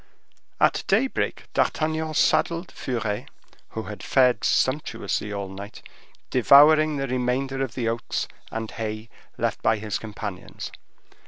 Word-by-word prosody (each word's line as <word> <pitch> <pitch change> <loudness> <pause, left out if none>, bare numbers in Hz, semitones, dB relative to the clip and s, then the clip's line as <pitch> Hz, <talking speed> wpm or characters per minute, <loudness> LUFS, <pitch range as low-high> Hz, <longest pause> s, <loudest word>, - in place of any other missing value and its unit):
At - - +3
daybreak 235 +7 +1
D'Artagnan 155 0 0
saddled 170 +4 +2
Furet, 110 -5 -3 0.5
who - - -1
had - - -8
fared 125 -1 +3
sumptuously 115 -7 0
all 100 -1 -3
night, 100 +2 -9 0.5
devouring 150 +4 +6
the 135 - -1
remainder 130 +2 -1
of 125 -4 -5
the 120 -3 -1
oats 115 +1 -2 0.2
and 110 0 -4
hay 110 0 -5 0.3
left - - -1
by 110 - +3
his 105 -1 -3
companions. 105 -3 -7
125 Hz, 120 wpm, -25 LUFS, 110-145 Hz, 0.5 s, devouring